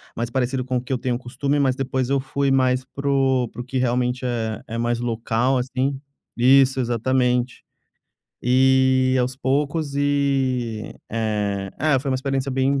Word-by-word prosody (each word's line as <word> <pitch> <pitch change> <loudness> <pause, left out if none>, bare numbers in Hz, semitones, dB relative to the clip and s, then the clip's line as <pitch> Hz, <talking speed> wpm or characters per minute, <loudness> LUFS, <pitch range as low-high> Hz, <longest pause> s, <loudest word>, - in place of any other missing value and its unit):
mais 115 0 -3
parecido 130 +1 -1
com 130 0 -1
o 120 - -1
que 130 +1 -4
eu - - +1
tenho 125 -1 -1
costume, 135 +3 -2
mas 130 -2 +2
depois 130 -1 -2
eu 140 0 +2
fui 135 +1 -1
mais 130 -1 +2
para 140 +1 -4
o 130 -3 +2
para 120 - -8
o - - -8
que 130 +1 -4
realmente 125 0 0
é 115 -3 -2
é 115 - -5
mais 120 0 0
local, 115 +2 0
assim 130 +2 -1 0.4
isso, 130 +1 +5
exatamente. 125 +1 0 0.8
E, 130 +1 +4
aos 125 +1 -2
poucos, 140 +3 -1
e, 135 -5 0 0.2
eh 105 -3 -2
é, 145 -2 +2
foi 135 +1 -3
uma - - +1
experiência 135 0 -2
bem 135 +1 +1
130 Hz, 170 wpm, -22 LUFS, 120-135 Hz, 0.8 s, isso